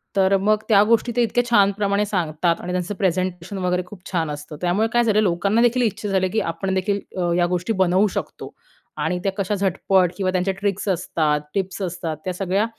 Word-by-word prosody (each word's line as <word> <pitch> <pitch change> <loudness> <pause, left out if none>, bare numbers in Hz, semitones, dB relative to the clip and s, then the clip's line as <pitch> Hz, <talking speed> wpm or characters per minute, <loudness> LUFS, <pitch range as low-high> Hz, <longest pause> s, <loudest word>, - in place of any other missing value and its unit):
तर 195 0 +4
मग 210 +2 +2
त्या 205 -2 +6
गोष्टी 230 +2 +2
ते 245 - +3
इतक्या 245 +1 +1
छानप्रमाणे 200 -1 +2
सांगतात 170 -4 0
आणि 180 - -5
त्यांचं 180 +3 -2
प्रेझेंटेशन 185 0 -2
वगैरे 180 -1 0
खूप 185 +1 -12
छान 165 -4 0
असतं. 150 +1 -7
त्यामुळे 180 +5 +1
काय 240 0 +4
झालं 215 -2 +3
लोकांना 200 +3 +1
देखील 240 +1 +3
इच्छा 215 -2 -1
झाली 190 -1 +1
की 220 - 0
आपण 190 +3 -3
देखील 200 +2 0 0.2
अ, 175 -1 0
या 175 - +3
गोष्टी 180 +5 -1
बनवू 185 +3 +3
शकतो - - -6 0.4
आणि 160 +4 -1
त्या 195 - +1
कशा 200 +1 -1
झटपट 190 -1 +2
किंवा 190 -2 0
त्यांच्या 185 +1 0
ट्रिक्स 200 0 -2
असतात, 160 -4 0
टिप्स 190 0 -3
असतात 175 -3 -3
त्या 185 - -2
सगळ्या 195 +3 0
190 Hz, 195 wpm, -22 LUFS, 180-205 Hz, 0.4 s, त्या